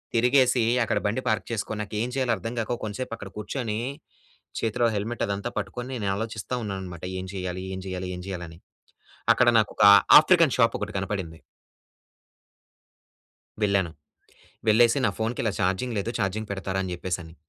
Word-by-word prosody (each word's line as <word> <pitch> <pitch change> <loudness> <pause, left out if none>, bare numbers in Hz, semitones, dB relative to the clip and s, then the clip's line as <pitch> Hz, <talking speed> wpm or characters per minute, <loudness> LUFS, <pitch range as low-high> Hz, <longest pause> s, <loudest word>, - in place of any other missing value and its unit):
తిరిగేసి 125 +1 +4 0.2
అక్కడ 115 - 0
బండి 115 +5 -1
పార్క్ 110 - 0
చేసుకొని, 110 -1 -3
నాకు 105 - -8
ఏం 120 - -1
చేయాలో 130 -3 +1
అర్థం 115 +6 -5
గాక, 115 +2 -1
కొంసేపు 110 +3 -4
అక్కడ 100 - -8
కూర్చొని, 110 0 -3 0.8
చేతిలో 115 +1 +1
హెల్మెట్ 110 +3 -2
అదంతా 100 +4 -3
పట్టుకొని, 115 +6 -6
నేను 100 - +1
ఆలోచిస్తా 110 +2 -5
ఉన్నానన్నమాట. 95 -4 -6 0.2
ఏం 95 - -7
చేయాలి, 90 -1 -4
ఏం 95 - -6
చేయాలి, 95 0 -4
ఏం - - -7
చేయాలి? 90 -2 -5
అని. 80 - -14 0.7
అక్కడ 125 - +3
నాకు 110 - 0
ఒక - - +3 0.4
ఆఫ్రికన్ 165 -4 +4
షాప్ 115 -2 +3
ఒకటి 105 0 -4
కనపడింది... 95 -5 -4 2.2
వెళ్ళాను. 100 -4 +2 0.8
వెళ్ళేసి 115 +4 +5
నా 105 - +3
ఫోన్‌కి 115 +2 -2
ఇలా 110 - +1
చార్జింగ్ 100 +6 0
లేదు. 100 +4 -2
చార్జింగ్ 105 +3 -2
పెడతారా? 95 -1 -3
అని 90 - -4
చెప్పేసి 90 0 -3
అని, 80 - -13
105 Hz, 160 wpm, -26 LUFS, 95-115 Hz, 2.2 s, వెళ్ళేసి